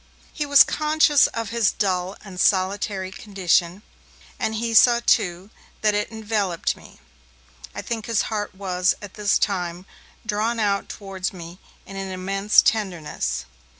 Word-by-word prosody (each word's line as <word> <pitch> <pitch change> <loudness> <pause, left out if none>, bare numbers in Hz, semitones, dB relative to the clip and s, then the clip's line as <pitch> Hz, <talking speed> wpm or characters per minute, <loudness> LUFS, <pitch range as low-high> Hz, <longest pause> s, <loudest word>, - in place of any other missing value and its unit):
He 295 -2 -3
was 285 0 +8
conscious 305 -1 +3
of 230 -2 -5
his 230 -3 +2
dull 185 -2 -1
and 185 -2 -9
solitary 190 0 +1
condition, 190 -2 0 0.6
and 220 - -1
he 230 +1 -2
saw, 235 +1 +6
too, 180 +3 +1 0.3
that 215 -1 +3
it 210 +1 -1
enveloped 210 -5 -1
me. - - -17 0.8
I - - -5
think 225 -3 -4
his 230 -3 +1
heart 210 -3 -4
was, 185 -2 0
at 205 -2 -10
this 210 -2 +1
time, 180 -2 -2 0.4
drawn 220 +3 -1
out 200 -2 0
towards 195 -2 -5
me 175 0 -10 0.3
in 195 - -9
an 195 0 -4
immense 195 +2 +2
tenderness. 180 - -1
200 Hz, 145 wpm, -23 LUFS, 185-220 Hz, 0.8 s, was